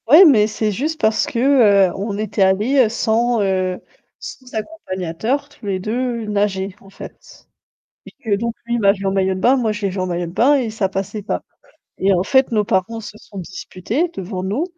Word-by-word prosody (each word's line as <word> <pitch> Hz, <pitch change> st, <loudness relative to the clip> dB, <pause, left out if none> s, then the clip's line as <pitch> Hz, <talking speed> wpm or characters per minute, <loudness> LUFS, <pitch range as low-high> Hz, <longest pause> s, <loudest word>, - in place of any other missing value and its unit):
Ouais, 315 Hz, +10 st, +9 dB
mais 220 Hz, -9 st, +5 dB
c'est 215 Hz, 0 st, -1 dB
juste 305 Hz, +10 st, -3 dB
parce 220 Hz, -6 st, +2 dB
que, -, -, -5 dB, 0.5 s
heu, -, -, -7 dB
on 200 Hz, +1 st, -4 dB
était 215 Hz, -1 st, -2 dB
allé, 205 Hz, +9 st, +3 dB
heu, -, -, -1 dB
sans, 230 Hz, +1 st, +1 dB
heu, 185 Hz, -2 st, 0 dB, 0.4 s
sans 255 Hz, -1 st, -10 dB
accompagnateur, 220 Hz, -, -3 dB
tous 285 Hz, -6 st, -16 dB
les 190 Hz, -2 st, -1 dB
2 235 Hz, +3 st, -2 dB
nager 200 Hz, -2 st, -1 dB
en 195 Hz, -, -16 dB
fait, -, -, -13 dB, 0.6 s
et -, -, -12 dB
que 210 Hz, -3 st, +1 dB
donc 235 Hz, +2 st, -3 dB
lui 235 Hz, 0 st, -2 dB
il 240 Hz, -, 0 dB
m'a 200 Hz, -2 st, +5 dB
vu 200 Hz, -1 st, -7 dB
en 195 Hz, -, +1 dB
maillot 190 Hz, -1 st, +1 dB
de 185 Hz, -, -5 dB
bain, 250 Hz, +7 st, +4 dB
moi 230 Hz, -4 st, 0 dB
je 210 Hz, 0 st, -7 dB
l'ai 200 Hz, -, 0 dB
vu 190 Hz, -, -6 dB
en 185 Hz, -, -1 dB
maillot 175 Hz, -1 st, -2 dB
de 170 Hz, -, -8 dB
bain, 255 Hz, +9 st, +4 dB
et 255 Hz, -5 st, 0 dB
ça 215 Hz, -3 st, -1 dB
passait 195 Hz, +2 st, -4 dB
pas, -, -, -3 dB, 0.6 s
et 195 Hz, +1 st, +2 dB
en 180 Hz, -, +1 dB
fait, 265 Hz, +5 st, +2 dB
nos 210 Hz, -2 st, +2 dB
parents 200 Hz, +4 st, -1 dB
se 215 Hz, -1 st, -10 dB
sont 200 Hz, -, -12 dB
disputés 190 Hz, -, -3 dB
devant 185 Hz, 0 st, -5 dB
nous, 210 Hz, -, -1 dB
210 Hz, 220 wpm, -19 LUFS, 190-235 Hz, 0.6 s, Ouais